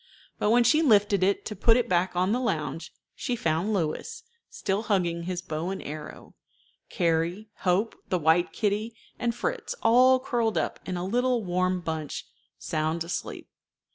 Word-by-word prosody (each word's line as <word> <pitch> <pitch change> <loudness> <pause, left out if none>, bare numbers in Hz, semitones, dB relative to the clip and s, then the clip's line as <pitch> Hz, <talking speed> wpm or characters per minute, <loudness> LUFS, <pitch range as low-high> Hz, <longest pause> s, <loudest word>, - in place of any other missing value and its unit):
But 210 - +1
when 240 +2 +5
she 310 +6 +4
lifted 205 - +4
it 195 +2 +1
to 210 - -5
put 225 +4 +4
it 245 - 0
back 180 +1 +1
on 185 +2 +2
the 240 - +1
lounge, 160 - -2 0.2
she 245 - -2
found 170 0 0
Louis, 205 - -2 0.3
still 195 +2 -2
hugging 175 -6 0
his 180 -1 -3
bow 160 0 -3
and 195 - -4
arrow, 150 +1 -8 0.6
Carrie, 170 +5 0
Hope, 195 +5 +1
the 185 - +2
white 165 +2 +3
kitty, 215 +2 -1 0.2
and 235 -1 0
Fritz, 485 - -3
all 255 +3 +6
curled 235 -4 0
up - - -1
in 185 -1 -2
a 175 - -3
little 245 +3 +1
warm 185 0 0
bunch, 160 -3 -4 0.3
sound 155 +2 -1
asleep. 170 - -5
190 Hz, 165 wpm, -27 LUFS, 170-225 Hz, 0.6 s, all